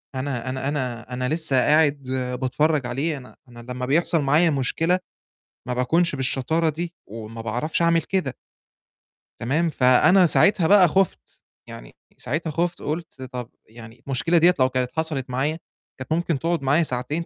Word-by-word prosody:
أنا 130 -2 -3
أنا 130 +1 -3
أنا 125 -4 -4
أنا 125 +1 -2
لسّه 155 -4 0
قاعد 145 +1 +3 0.4
باتفرّج 145 +1 +1
عليه 140 +5 -2
أنا 125 -1 -13
أنا 120 0 -13
لمّا 125 +1 -5
بيحصل 160 +3 +2
معايا 150 +5 +3
مشكلة 165 +6 0 0.7
ما 125 - -1
باكونش 150 +6 +1
بالشطارة 140 +5 0
دي 170 +3 -4 0.2
وما 115 +1 -8
باعرفش 125 +10 -2
أعمل 170 0 +3
كده. 185 -10 -2 1.0
تمام، 150 +8 0
فأنا 140 +8 +4
ساعتها 175 0 +3
بقى 195 -3 +6
خُفت، 190 +4 -1 0.2
يعني - - -11 0.2
ساعتها 155 +5 -3
خُفت، 175 +2 -2
قُلت 155 -3 -5
طَب 125 -2 -7 0.2
يعني 115 +1 -14
المشكلة 135 +6 +1
ديّة 175 +2 +6
لو 130 0 +4
كانت 125 -1 -2
حصلت 155 -5 -2
معايا 145 +6 -1 0.4
كانت 130 - -8
ممكن 165 -2 0
تقعُد 170 +1 -1
معايا 145 +5 +2
ساعتين، 150 +5 -3
140 Hz, 155 wpm, -23 LUFS, 125-165 Hz, 1.0 s, بقى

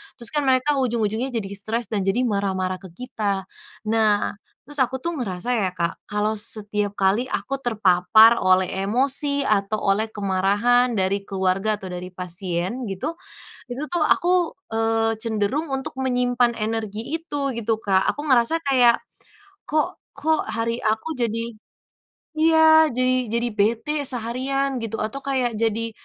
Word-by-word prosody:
Terus 235 -1 0
kan 295 -2 -1
mereka 265 +2 +2
ujung-ujungnya 235 -1 0
jadi 225 -6 -4
stres 225 +3 -3
dan 195 -3 -1
jadi 240 +6 +2
marah-marah 190 -4 -1
ke 190 - -11
kita. 210 -6 -3 0.5
Nah, 215 -2 +2 0.3
terus 290 -1 0
aku 260 +1 +1
tuh 340 +6 -4
ngerasa 190 +1 -4
ya, 190 - +1
Kak, 170 -1 -3
kalau 210 +1 0
setiap 210 -1 0
kali 205 +6 +1
aku 275 0 -3
terpapar 220 0 +5
oleh 185 0 +4 0.2
emosi 275 +6 +1
atau 210 0 +1 0.2
oleh 220 +2 -2
kemarahan 205 +5 +2
dari 195 +1 +1
keluarga 195 +2 0
atau 195 - -10
dari 180 0 -6
pasien 180 +5 -4
gitu, 195 - -3 0.5
itu 250 +2 -6
tuh 345 -3 +1
aku, 355 -1 +2 0.2
eee, 225 0 +1
cenderung 220 +7 -1
untuk 265 0 -4
menyimpan 245 -2 +1
energi 215 -1 -2 0.2
itu 290 -4 -3
gitu, 225 -1 -1
Kak. 190 -1 +2
Aku 290 - -6
ngerasa 260 +6 +3
kayak, 245 -3 +4 0.7
kok 310 +4 -1 0.2
kok 315 +2 +1
hari 230 +1 -2
aku 220 +9 -1
jadi 230 -4 -1 1.0
iya, 315 -1 +6
jadi 255 +1 +1 0.2
jadi 235 +1 0
bete 225 +8 +1
seharian 265 +2 -1
gitu 225 0 -4
atau 225 +6 -4
kayak 255 -4 -1
jadi 230 0 0
225 Hz, 145 wpm, -23 LUFS, 205-260 Hz, 1.0 s, iya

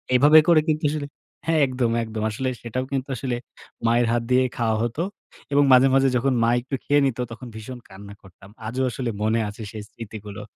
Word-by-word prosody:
এভাবে 150 +4 +8
করে 160 -2 +6
কিন্তু 155 +1 0
আসলে 145 -2 -3 0.4
হ্যাঁ, 160 -1 +3
একদম, 125 -2 -1
একদম 110 -1 -5
আসলে 130 +4 -2
সেটাও 125 +2 -3
কিন্তু 135 0 -2
আসলে 125 -1 -3 0.5
মায়ের 120 0 +3
হাত 120 0 +1
দিয়ে 130 +1 +5
খাওয়া 110 -2 +1
হত, 120 +3 -3 0.6
এবং 145 0 +5
মাঝে, 130 +1 +7
মাঝে 135 0 +4
যখন 135 +2 +1
মা 115 - +3
একটু 135 +2 -4
খেয়ে 145 0 +3
নিত, 125 -2 -1
তখন 120 +2 -9
ভীষণ 120 +3 -8
কান্না 100 +1 -11
করতাম, 95 +1 -17 0.2
আজও 130 +3 -2
আসলে 125 -1 -3
মনে 110 +1 +2
আছে 105 +2 -10
সেই 110 -2 -7
স্মৃতিগুলো। 105 -2 -9
120 Hz, 195 wpm, -23 LUFS, 110-135 Hz, 0.6 s, এভাবে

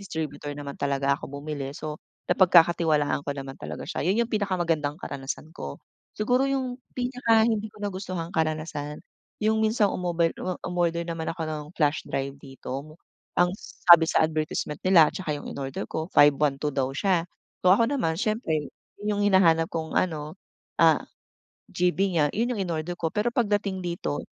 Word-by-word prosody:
distributor 155 -6 -5
naman 140 -1 -6
talaga 140 0 +1
ako - - -8
bumili. 145 -2 -4
So 155 0 -6 0.3
napagkakatiwalaan 170 -5 +4
ko 145 - -4
naman 135 -1 -6
talaga - - -6
siya. - - -4
'Yun 210 +6 +3
'yung - - -22
pinakamagandang 175 -8 0
karanasan 145 -1 -6
ko. 70 0 -6 0.4
Siguro 250 +5 +2
'yung 260 -2 -2 0.2
pinaka 245 -3 +3
hindi 220 -2 0
ko 210 - -17
nagustuhang 185 -3 -4
karanasan, 155 -2 -2 0.5
'yung 220 0 +3
minsan 220 0 +3
umobile 170 -2 0
umo 185 -1 -2
umorder 170 -1 0
naman 165 -1 -4
ako 165 0 -4
ng 155 -1 -4
flash 150 -1 +2
drive 135 0 -2
dito, 135 -2 -9
mo 155 +1 -14 0.4
ang 175 0 +3
sabi 170 -2 +5
sa - - +3
advertisement 155 -1 -1
nila, 170 -5 +7
tsaka 155 -5 -3
'yung 145 - -7
inorder 135 -1 -4
ko, 160 0 -2
512 145 0 +4
daw 135 -2 0
siya. 175 +1 +1 0.4
So 180 - +8
ako 230 +4 +2
naman 245 -13 0
siyempre 185 - -1 0.3
'yung 205 -1 0
hinahanap 165 -5 +5
kung 160 -1 -3
ano 155 -1 -2 0.4
ah, - - +5 0.7
GB 180 +2 +1
niya 155 -4 +3
'yun 235 +4 0
'yung 210 -5 -2
inorder 170 +1 -3
ko. 165 - 0
Pero 215 +3 +1
pagdating 205 -5 0
dito, 175 -4 -3
170 Hz, 160 wpm, -26 LUFS, 150-200 Hz, 0.7 s, So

